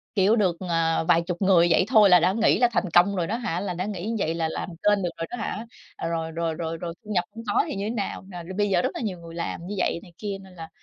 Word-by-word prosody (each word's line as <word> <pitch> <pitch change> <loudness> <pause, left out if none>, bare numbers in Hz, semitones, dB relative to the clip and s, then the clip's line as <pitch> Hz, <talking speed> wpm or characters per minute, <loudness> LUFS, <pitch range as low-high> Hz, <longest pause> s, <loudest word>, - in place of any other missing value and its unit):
Kiểu 200 +3 +4
được, 185 -6 +2
ờ, 165 -3 +1
vài 170 - +5
chục 175 +2 -4
người 185 -3 +5
vậy 185 - +4
thôi 215 -5 +6
là 180 -1 +8
đã 180 +3 +3
nghĩ 220 +2 +3
là 245 - +4
thành 190 -5 0
công 180 +4 +4
rồi 175 -2 0
đó 220 - -1
hả, 220 -8 -2
là 190 -2 -3
đã 180 +2 -3
nghĩ 200 -2 -4
như 230 - -1
vậy 165 -4 0
là 165 -1 -1
làm - - -4
kênh 195 +4 +1
được 175 - -1
rồi 165 - -3
đó - - -4
hả, 225 0 -4 0.4
rồi, 165 -1 -3
rồi, 165 0 -2
rồi, 165 0 -4
rồi 170 0 -6
thu 210 - -11
nhập 180 -1 +2
hông 230 - -8
có 205 - +2
thì - - -4
như 200 - -3
thế 220 - -2
nào, 205 -4 -3
à, 175 -2 -7 0.2
bây 205 0 +2
giờ 180 -3 +2
rất - - 0
là - - -4
nhiều 200 -6 -3
người 165 -1 -11
làm 170 0 -4
như 205 - -4
vậy 175 - 0
này 175 - -15
kia. 205 -2 -4
Nên 190 -1 -15
là 165 -2 -8
180 Hz, 305 wpm, -25 LUFS, 170-205 Hz, 0.4 s, là